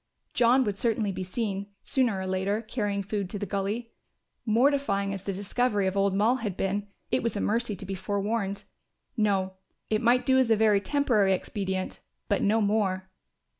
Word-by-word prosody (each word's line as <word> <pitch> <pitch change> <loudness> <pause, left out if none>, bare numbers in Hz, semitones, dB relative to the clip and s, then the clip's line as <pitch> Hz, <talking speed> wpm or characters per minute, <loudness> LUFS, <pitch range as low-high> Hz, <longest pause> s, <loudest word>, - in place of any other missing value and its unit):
John 250 +2 +4
would 205 -4 -3
certainly 220 -3 +1
be 190 0 -4
seen, 200 0 -3 0.2
sooner 245 -7 +1
or 190 - -3
later, 190 +4 -1
carrying 205 -3 -2
food 200 -2 -3
to 205 - -4
the 205 - -3
gully. 205 +4 -3 0.6
Mortifying 220 -4 +2
as 195 -1 -6
the 200 - -2
discovery 205 +2 0
of 190 0 0
old 195 -1 +2
Moll 220 +6 +3
had 210 -7 -4
been, 200 +1 -1 0.2
it - - +2
was 230 -2 -1
a - - -1
mercy 225 0 0
to 195 - -9
be 195 - -4
forewarned. 200 +1 -2 0.5
No, 195 -4 +1 0.4
it 215 0 +2
might 245 +1 +3
do 260 0 +4
as 255 -3 +3
a 225 - +6
very 210 -2 +4
temporary 215 -5 +2
expedient, 190 0 -3 0.3
but 205 - +1
no 220 +2 +3
more. 195 -3 0
205 Hz, 180 wpm, -27 LUFS, 195-230 Hz, 0.6 s, a